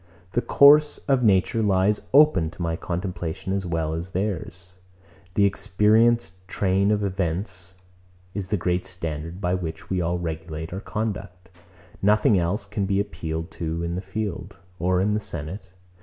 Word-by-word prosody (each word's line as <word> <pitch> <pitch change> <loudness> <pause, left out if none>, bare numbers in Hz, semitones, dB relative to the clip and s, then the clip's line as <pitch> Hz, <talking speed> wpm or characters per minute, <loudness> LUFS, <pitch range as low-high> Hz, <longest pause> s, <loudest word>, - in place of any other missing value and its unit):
The 120 - +1
course 150 +3 +6
of 135 -3 +3
nature 105 0 +3
lies 100 0 +2
open 140 - +5
to 85 - -11
my 85 -1 -1
contemplation 90 0 -4
as 95 -2 -2
well 80 -2 -1
as 85 +2 -4
to 95 - -21
theirs. 90 -2 -4 0.6
The 100 - +4
experienced 105 -1 +2
train 95 +1 +1
of 105 -1 +1
events 95 0 -3 0.6
is 100 -2 -4
the 105 +2 0
great 90 +1 -1
standard, 85 -1 -5
by 90 -2 0
which 80 -2 -5
we 95 -1 +1
all 85 +1 0
regulate 80 -1 -5
our 95 - -3
conduct. 100 -5 -5 0.5
Nothing 105 0 +4
else 90 +4 -1
can 100 -1 -2
be 100 0 +1
appealed 80 -5 -4
to 85 0 -3
in 85 0 -2
the 90 - -3
field, 95 -1 -5 0.2
or 90 +2 +2
in 105 +3 +2
the 105 - +1
senate. 95 -1 -7
95 Hz, 160 wpm, -24 LUFS, 85-105 Hz, 0.6 s, course